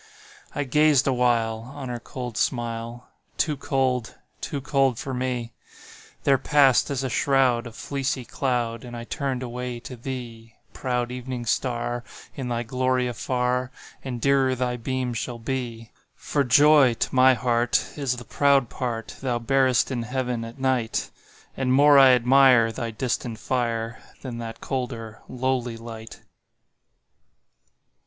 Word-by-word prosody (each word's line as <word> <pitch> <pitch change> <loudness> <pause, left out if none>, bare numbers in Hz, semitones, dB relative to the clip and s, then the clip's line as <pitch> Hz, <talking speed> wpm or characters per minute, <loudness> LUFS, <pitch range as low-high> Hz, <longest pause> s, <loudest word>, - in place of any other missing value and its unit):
I 145 - 0
gazed 150 0 +4
awhile 120 -4 +1 0.2
On 140 -3 -6
her 120 -1 -4
cold 125 -1 -7
smile; 120 0 -3 0.3
Too 155 -3 +1
cold—too 135 0 -3
cold 135 -3 +1
for 135 - -5
me— 125 -2 -3 0.7
There 135 -2 +4
passed, 140 -1 +4
as 135 -2 -2
a - - 0
shroud, 125 -2 +2
A - - -9
fleecy 130 +1 -3
cloud, 120 -3 -2
And 120 -1 -8
I 115 - -6
turned 130 0 -3
away 125 0 -5
to 125 - -8
thee, 120 -2 -7 0.2
Proud 125 -1 -2
Evening 125 -1 -5
Star, 120 0 -1 0.3
In 135 -3 -5
thy 120 0 -1
glory 130 +1 0
afar 125 +1 -1 0.3
And 125 -3 -4
dearer 135 0 +3
thy 125 -1 -1
beam 125 +1 -2
shall 120 +1 -4
be; 115 -2 -5 0.2
For 145 - -1
joy 140 -1 +6
to - - -2
my 130 0 +6
heart 120 0 +1
Is 135 -4 -1
the 120 - -9
proud 140 -4 +2
part 115 -3 -4
Thou 125 -3 0
bearest 130 +1 +2
in 125 -2 -2
Heaven 125 -1 -2
at 115 +2 -9
night, 130 -4 -1 0.4
And 130 -1 0
more 145 +2 +7
I 135 -1 +8
admire 125 -1 +5
Thy 115 0 -4
distant 115 0 -3
fire, 115 -2 -2 0.2
Than 120 -3 -5
that 115 -1 -7
colder, 120 -4 -4
lowly 125 -2 -1
light. 115 -1 -10
125 Hz, 140 wpm, -25 LUFS, 120-130 Hz, 0.7 s, I